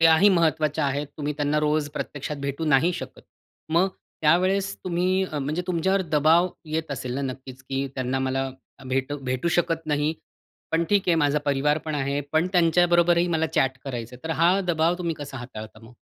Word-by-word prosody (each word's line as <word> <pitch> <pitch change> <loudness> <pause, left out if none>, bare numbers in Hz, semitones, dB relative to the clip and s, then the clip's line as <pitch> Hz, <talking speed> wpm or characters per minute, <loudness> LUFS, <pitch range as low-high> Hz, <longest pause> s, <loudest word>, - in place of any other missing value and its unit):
त्याही 165 +4 +6
महत्त्वाच्या 155 -2 +1
आहेत. 140 +1 -1
तुम्ही 150 -1 -2
त्यांना 145 0 +1
रोज 150 0 +1
प्रत्यक्षात 145 +1 -4
भेटू 140 +3 -2
नाही 160 +7 +4
शकत. - - -7 0.6
मग 185 +3 +4 0.3
त्यावेळेस 190 +5 +2
तुम्ही 185 +1 +1
अ, 150 - -2
म्हणजे 150 +5 -2
तुमच्यावर 190 +2 +1
दबाव 160 +4 +4 0.2
येत 160 -1 -2
असेल 125 -2 -4
ना, 140 - -2
नक्कीच, 130 0 -12
की 135 +1 -2
त्यांना 130 0 -1
मला 130 0 -1 0.4
भेटू 135 +3 -1
भेटू 130 +6 0
शकत 165 -2 0
नाही. 150 +1 +1 0.6
पण 165 +1 +2
ठीक 200 -2 +2
आहे 175 - +5
माझा 145 +1 +2
परिवार 145 +1 +2
पण 155 -1 -3
आहे. 140 0 -1
पण 160 +2 +3
त्यांच्याबरोबरही 175 0 +4
मला 160 0 +1
चॅट 135 -1 +2
करायचंय. 125 -2 -6
तर 160 - -3
हा 170 +1 +6 0.2
दबाव 165 +1 +2
तुम्ही 170 -2 -2
कसा 145 -2 -7
हाताळता 110 -3 -9
मग? 115 +2 -14
150 Hz, 175 wpm, -25 LUFS, 135-170 Hz, 0.6 s, त्याही